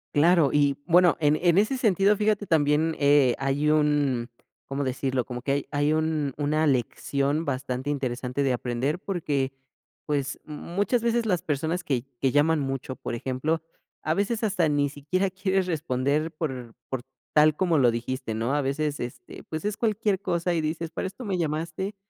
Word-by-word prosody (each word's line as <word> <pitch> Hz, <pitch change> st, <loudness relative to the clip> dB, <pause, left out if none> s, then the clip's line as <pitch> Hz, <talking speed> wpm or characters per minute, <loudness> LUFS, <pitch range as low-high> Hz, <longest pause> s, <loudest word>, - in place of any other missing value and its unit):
Claro 165 Hz, 0 st, +5 dB
y, 145 Hz, -1 st, +3 dB
bueno, 175 Hz, 0 st, +5 dB
en 150 Hz, -1 st, +3 dB
en 175 Hz, 0 st, +4 dB
ese 215 Hz, +6 st, +3 dB
sentido, 205 Hz, -3 st, +3 dB
fíjate 210 Hz, 0 st, +1 dB
también, 155 Hz, -1 st, +2 dB
eh, 140 Hz, -3 st, +5 dB
hay 140 Hz, +3 st, +1 dB
un 145 Hz, -5 st, +2 dB, 0.4 s
¿cómo 140 Hz, +1 st, -2 dB
decirlo?, 130 Hz, -1 st, -1 dB
como 125 Hz, 0 st, -6 dB
que 135 Hz, -, -1 dB
hay 140 Hz, +1 st, -1 dB
hay 145 Hz, +1 st, +2 dB
un 155 Hz, -3 st, 0 dB
una 155 Hz, +2 st, +1 dB
lección 140 Hz, +3 st, 0 dB
bastante 130 Hz, -1 st, -3 dB
interesante 130 Hz, -1 st, -2 dB
de 135 Hz, -2 st, +2 dB
aprender 125 Hz, +6 st, -1 dB
porque, 150 Hz, -9 st, -1 dB, 0.5 s
pues, 140 Hz, -2 st, -2 dB
muchas 185 Hz, +9 st, -1 dB
veces 235 Hz, 0 st, +1 dB
las 180 Hz, -6 st, +1 dB
personas 160 Hz, +2 st, -2 dB
que 125 Hz, -3 st, -1 dB, 0.2 s
que 135 Hz, -, +2 dB
llaman 150 Hz, +3 st, +3 dB
mucho, 135 Hz, -1 st, -3 dB
por -, -, -5 dB
ejemplo, 135 Hz, +7 st, -2 dB, 0.4 s
a 155 Hz, -, +1 dB
veces 205 Hz, +5 st, -1 dB
hasta 190 Hz, -7 st, +2 dB
ni 145 Hz, -1 st, +2 dB
siquiera 170 Hz, +7 st, -1 dB
quieres 190 Hz, 0 st, 0 dB
responder 150 Hz, -2 st, 0 dB
por 130 Hz, -8 st, -5 dB
por 130 Hz, -2 st, -3 dB, 0.3 s
tal 155 Hz, 0 st, +6 dB
como 170 Hz, -2 st, +2 dB
lo 125 Hz, -3 st, +5 dB
dijiste, 120 Hz, 0 st, -3 dB
¿no? 115 Hz, +5 st, -1 dB
A 145 Hz, -, +2 dB
veces, 145 Hz, +2 st, -1 dB
este, 120 Hz, 0 st, -8 dB
pues 155 Hz, +2 st, -4 dB
es 210 Hz, 0 st, -1 dB
cualquier 210 Hz, -3 st, 0 dB
cosa 175 Hz, -2 st, 0 dB
y 165 Hz, -, +1 dB
dices: 160 Hz, +1 st, -3 dB
"¿Para 190 Hz, -, -3 dB
esto 200 Hz, +6 st, -9 dB
me 190 Hz, -3 st, -1 dB
llamaste?". 165 Hz, +5 st, -2 dB
150 Hz, 175 wpm, -26 LUFS, 135-175 Hz, 0.5 s, tal